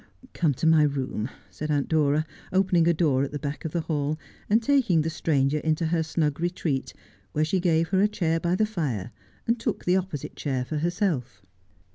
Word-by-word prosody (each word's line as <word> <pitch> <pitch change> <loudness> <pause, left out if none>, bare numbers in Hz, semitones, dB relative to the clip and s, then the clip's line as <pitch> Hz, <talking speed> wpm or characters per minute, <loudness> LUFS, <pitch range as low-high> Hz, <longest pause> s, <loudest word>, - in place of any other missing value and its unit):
' 255 - -20
Come 155 -6 +1
to 160 - -3
my 160 -1 +6
room,' 135 -5 -1 0.2
said 155 - -5
Aunt 145 -2 +1
Dora, 155 -1 +2 0.3
opening 185 -3 +3
a - - +6
door 150 -5 +2
at 140 - -1
the 145 - -3
back 145 +1 -5
of 160 - -2
the 170 - 0
hall, 150 -1 -1 0.3
and 215 +2 +5
taking 235 - +3
the 165 +2 -2
stranger 150 -2 +1
into 160 +2 0
her 165 +1 +1
snug 155 -2 -1
retreat, 170 -6 -1 0.4
where 155 +1 +2
she 185 +4 +1
gave 165 -2 +2
her 190 0 +3
a 205 - +5
chair 165 -6 0
by 170 +2 +1
the 215 - +2
fire, 140 - -3 0.3
and 230 0 +1
took 230 -2 -2
the 180 +1 +4
opposite 180 -7 -4
chair 130 -4 -2
for 155 - -3
herself. 160 - -1
160 Hz, 205 wpm, -26 LUFS, 145-180 Hz, 0.4 s, my